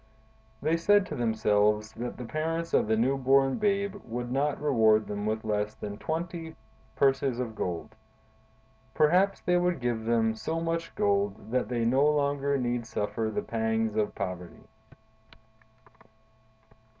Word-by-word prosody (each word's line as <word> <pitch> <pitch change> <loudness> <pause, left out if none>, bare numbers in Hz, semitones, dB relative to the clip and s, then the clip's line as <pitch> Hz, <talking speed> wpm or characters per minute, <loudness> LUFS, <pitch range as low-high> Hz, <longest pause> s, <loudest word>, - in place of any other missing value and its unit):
They 160 +2 +2
said 205 +4 +4
to - - -6
themselves 105 -2 +1
that 120 +2 -6
the 125 - -6
parents 165 +6 -3
of - - +3
the 110 0 +2
new 130 +5 +2
born 135 - +3
babe 200 -1 0
would 120 +1 -5
not 140 +3 0
reward 110 -7 +3
them 105 0 -4
with 110 0 -2
less 105 0 -1
than 105 0 -7
twenty 165 0 -4 0.4
purses 135 -2 +2
of 120 -3 -3
gold; 90 -5 -4 1.0
perhaps 180 +6 +3
they 180 0 +2
would 175 -3 +1
give 120 -3 -2
them 115 -1 +2
so 160 +9 -3
much 165 0 -3
gold 100 +2 0
that 125 -3 0
they 120 -2 0
no 130 +4 +3
longer 140 -1 +1
need 120 -2 -2
suffer 110 +1 -2
the 110 - -3
pangs 110 -1 -1
of 105 -1 0
poverty. 90 -3 -6
120 Hz, 145 wpm, -28 LUFS, 110-155 Hz, 1.0 s, said